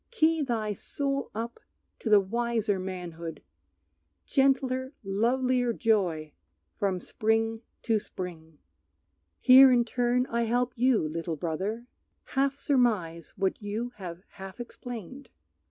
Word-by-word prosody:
Key 325 -8 +2
thy 225 -6 -1
soul 275 +6 -3
up 230 +2 -4 0.4
to 225 - -3
the 210 -1 +8
wiser 225 0 0
manhood, 175 -3 -6 0.8
Gentler 265 -1 +1
lovelier 245 +4 +1
joy 180 -10 +1 0.4
from 190 -2 0
spring 225 +3 0 0.2
to 225 -3 +2
spring!" 165 -6 -8 0.8
Here 265 +1 +9
in 240 -1 +4
turn 245 +1 +1
I 235 0 +1
help 245 +2 0
you, 245 -8 +3
little 165 +1 -3
brother, 190 +9 -3 0.5
Half 275 0 +1
surmise 210 - 0
what 195 +1 -1
you 215 +4 -3
have 180 -2 -7
half 195 +2 -10
explained. 245 +1 -8
225 Hz, 115 wpm, -28 LUFS, 190-250 Hz, 0.8 s, Here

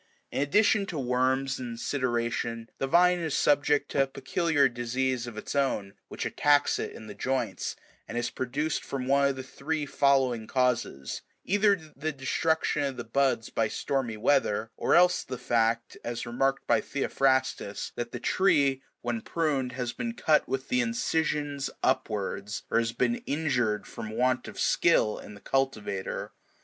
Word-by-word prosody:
In - - -1
addition 200 +7 +3
to 170 - -4
worms 130 +1 +1
and 120 -2 -5
sideration, 120 -3 -1
the 135 - 0
vine 180 +3 +5
is 160 -4 -1
subject 145 0 +2
to 140 - +2
a 135 - +2
peculiar 145 +2 +1
disease 125 0 -1
of 115 -2 -8
its - - -5
own, 105 -8 0
which - - -5
attacks 145 0 +3
it - - -4
in 110 - -10
the 105 - -8
joints, 120 -3 -2 0.3
and 120 - -5
is 120 - -1
produced 145 +5 -2
from 135 -2 -4
one 140 +1 +4
of 140 - 0
the 130 - -6
three 150 +3 -3
following 135 -5 +2
causes: 125 - 0
— - - -46
either 205 +1 +4 0.2
the 155 +3 -2
destruction 150 +3 0
of 135 -2 -2
the 120 - -4
buds 125 -1 0
by 115 - +1
stormy 120 -1 -2
weather, 110 -2 +1
or - - +2
else 180 +1 +5
the 125 - -6
fact, 115 -1 0
as 120 0 -4
remarked 135 +3 0
by - - +3
Theophrastus, 130 -6 0
that 120 0 -4
the 120 - -5
tree, 140 -5 +2 0.2
when 120 -2 -2
pruned, 140 -6 -1
has 125 -2 -3
been 235 -2 -4
cut 155 -9 +3
with 135 0 -3
the 250 0 +3
incisions 150 - -1
upwards,96 105 -4 -1
or - - +6
has 115 0 0
been 235 - +1
injured 125 -9 0
from 110 -1 -7
want 125 +3 0
of - - -8
skill 105 - +3
in 105 - -10
the 100 - -14
cultivator. 110 -8 -2
130 Hz, 165 wpm, -28 LUFS, 120-145 Hz, 0.3 s, or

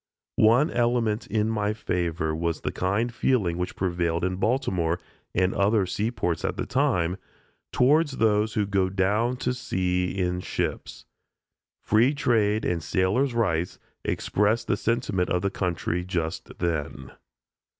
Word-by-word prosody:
One 120 +8 +5
element 120 -2 +1
in 105 0 0
my 105 -1 0
favor 85 -6 -2
was 85 0 -2
the - - -2
kind 105 +6 -1
feeling 100 -10 +1
which 90 - -3
prevailed 85 -2 -1
in 90 0 0
Baltimore, 95 -7 0 0.4
and 95 +1 +2
other 100 0 +2
seaports 95 -3 -2
at - - -2
the - - -2
time, 115 - +1 0.5
towards 145 +3 +3
"those 105 -1 +2
who 105 - +2
go 95 -2 +1
down 105 +6 +1
to 125 - -1
the - - -1
sea 90 -7 -1
in 90 -1 0
ships." - - -4 0.8
"Free 120 +7 +3
trade 110 -5 +2
and 85 -2 0
sailors' 105 - +1
rights" 90 -7 0 0.3
expressed 105 +3 0
the - - +1
sentiment 115 -6 0
of 90 0 0
the 100 - 0
country 90 -1 -2
just 85 -1 -4
then. 75 -6 -3
100 Hz, 140 wpm, -26 LUFS, 90-115 Hz, 0.8 s, One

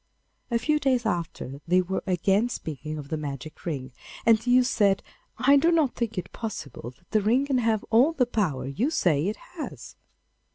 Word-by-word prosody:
A 235 - +2
few 300 +6 +1
days 255 -4 +1
after 165 -8 -3
they 180 +2 +4
were 185 +1 -1
again 195 +5 +2
speaking 155 - -5
of 145 -2 -8
the 160 - -1
magic 145 0 -7
ring, 135 -5 -3 0.3
and 225 -1 +6
the 245 - -4
youth 250 0 +5
said, 200 -5 +2 0.3
'I 280 +2 +5
do 330 +5 +4
not 315 -6 +2
think 230 -3 -3
it 180 - -5
possible 190 - -6
that 175 - -33
the 215 - +3
ring 240 +7 +2
can 270 -3 +1
have 225 -3 +1
all 245 +8 +5
the 280 -6 +2
power 185 - -1
you 195 - -1
say 175 - +2
it 210 - -2
has. 335 -4 -9
215 Hz, 195 wpm, -26 LUFS, 160-250 Hz, 0.3 s, and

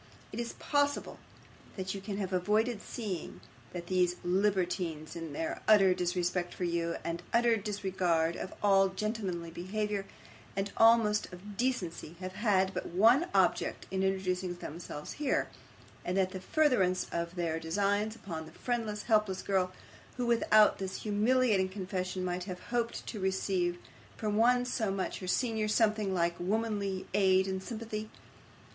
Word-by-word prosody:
Is 235 0 -3
it - - -10
possible 285 -1 0 0.6
that 190 -1 -3
you 195 - -6
can 200 0 -4
have 190 -2 -3
avoided 210 +4 +1
seeing, 205 -9 -5 0.3
that 175 -1 -6
these 180 -1 +2
libertines, 180 -4 0
in 165 -2 -5
their 160 +3 -3
utter 195 -4 +7
disrespect 180 0 -1
for - - -4
you, 170 -1 0
and 170 +1 -3
utter 235 0 +4
disregard 185 -5 0
of 190 - -5
all 195 -1 +5
gentlemanly 190 -4 -3
behaviour, 200 +3 -3 0.5
and 200 +1 -2
almost 225 -2 +4
of 195 +3 -10
decency, 190 -9 -2
have 185 0 -5
had 195 -2 +2
but - - -3
one 230 - +4
object - - +2
in 190 0 0
introducing 185 -2 0
themselves 165 -3 -7
here, 280 -3 +1 0.5
and 180 +2 -1
that 190 -1 +2
the 185 - -6
furtherance 195 -8 +2
of 170 +1 -3
their 165 -2 -1
designs 205 +6 0
upon 160 -7 -7
a - - -16
friendless, 220 -1 -2
helpless 210 -4 +2
girl, 185 -2 +1 0.5
who, 250 - -1
without 215 -2 +5
this 190 -1 -4
humiliating 215 -2 +3
confession, 185 -1 -3
might 180 0 -2
have 180 -2 -6
hoped 235 -1 -1
to 215 - -5
receive 190 -2 0 0.4
from 210 -1 -1
one 245 +3 +4
so 230 -4 -1
much 195 -1 -2
her 185 - -6
senior 220 +1 +1
something 215 -2 +2
like 170 -2 +1
womanly 200 0 -1
aid 190 -1 +4
and 190 0 -2
sympathy? 215 0 -5
195 Hz, 150 wpm, -31 LUFS, 180-215 Hz, 0.6 s, utter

